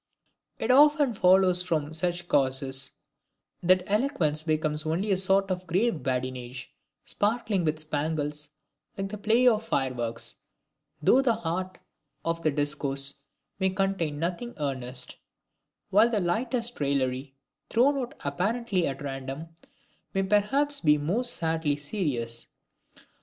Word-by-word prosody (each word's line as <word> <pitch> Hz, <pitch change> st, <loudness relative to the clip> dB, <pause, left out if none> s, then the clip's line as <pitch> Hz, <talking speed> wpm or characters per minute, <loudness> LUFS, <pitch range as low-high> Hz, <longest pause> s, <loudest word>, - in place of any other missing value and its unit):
It 230 Hz, -, 0 dB
often 290 Hz, -1 st, +5 dB
follows 185 Hz, -2 st, +6 dB
from 160 Hz, -4 st, -2 dB
such 175 Hz, +2 st, -1 dB
causes, 135 Hz, -1 st, +1 dB, 0.7 s
that 180 Hz, +1 st, +4 dB
eloquence 200 Hz, -, +1 dB
becomes 155 Hz, -1 st, 0 dB
only 170 Hz, +6 st, -1 dB
a 190 Hz, -, +3 dB
sort 195 Hz, 0 st, +2 dB
of 185 Hz, 0 st, -3 dB
grave 185 Hz, +1 st, +1 dB
badinage, 125 Hz, -1 st, -4 dB, 0.3 s
sparkling 210 Hz, -3 st, 0 dB
with 155 Hz, 0 st, 0 dB
spangles 150 Hz, -1 st, -2 dB, 0.5 s
like 195 Hz, 0 st, -3 dB
the 210 Hz, 0 st, -6 dB
play 225 Hz, +4 st, +3 dB
of 220 Hz, -2 st, +4 dB
fireworks, 120 Hz, -, -2 dB, 0.7 s
though 255 Hz, -, +5 dB
the 240 Hz, -4 st, +2 dB
heart 185 Hz, +2 st, -3 dB, 0.5 s
of 165 Hz, 0 st, -1 dB
the 155 Hz, -, +2 dB
discourse 140 Hz, -1 st, -1 dB, 0.5 s
may 190 Hz, -1 st, +2 dB
contain 190 Hz, -5 st, -1 dB
nothing 180 Hz, +9 st, -3 dB
earnest; 130 Hz, -3 st, -4 dB, 0.7 s
while 215 Hz, +4 st, +5 dB
the 220 Hz, -3 st, +1 dB
lightest 230 Hz, +6 st, -1 dB
raillery, 135 Hz, -1 st, -1 dB, 0.3 s
thrown 260 Hz, +5 st, +3 dB
out 250 Hz, -2 st, -5 dB
apparently 195 Hz, +5 st, 0 dB
at 135 Hz, +1 st, -5 dB
random, 135 Hz, +3 st, -5 dB, 0.7 s
may 195 Hz, -, +2 dB
perhaps 270 Hz, +9 st, +2 dB
be 150 Hz, -2 st, +4 dB
most 205 Hz, +12 st, 0 dB
sadly 160 Hz, -3 st, 0 dB
serious. 140 Hz, -, -2 dB
170 Hz, 125 wpm, -27 LUFS, 145-205 Hz, 0.7 s, follows